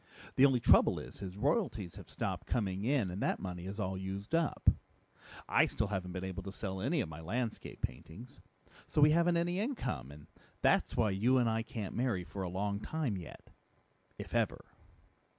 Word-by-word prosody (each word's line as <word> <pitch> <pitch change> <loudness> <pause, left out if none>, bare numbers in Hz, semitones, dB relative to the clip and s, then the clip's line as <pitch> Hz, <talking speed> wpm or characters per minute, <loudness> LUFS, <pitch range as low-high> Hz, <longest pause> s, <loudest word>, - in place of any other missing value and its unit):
The 135 - +8
only 130 -3 +2
trouble - - +5
is, - - -8
his 95 -1 -6
royalties 120 - 0
have - - -11
stopped - - -3
coming 100 -3 -1
in 125 -8 +2
and 95 +4 -5
that - - +1
money 90 -1 -5
is 100 +3 -6
all 95 -2 -1
used 95 +5 -5
up. 165 -1 0 0.8
I - - +5
still - - -1
haven't 95 -3 -2
been 90 0 -4
able 95 -1 -4
to 95 - -6
sell 95 -1 -4
any 155 - +1
of 105 - -3
my 80 0 -8
landscape 110 +7 -3
paintings. 110 - -6 0.5
So - - -1
we 150 +1 +7
haven't 170 +2 +4
any 175 +2 0
income, 205 - -2
and 75 0 -12 0.4
that's - - +3
why 110 -3 +3
you 115 +7 +3
and 120 -2 +3
I 115 0 +1
can't 110 -3 -5
marry 115 -7 0
for 95 +2 -6
a 90 - -2
long 100 +2 -1
time 145 -2 -2
yet 90 -3 -9 0.7
if - - -8
ever!" - - 0
105 Hz, 190 wpm, -34 LUFS, 95-130 Hz, 0.8 s, The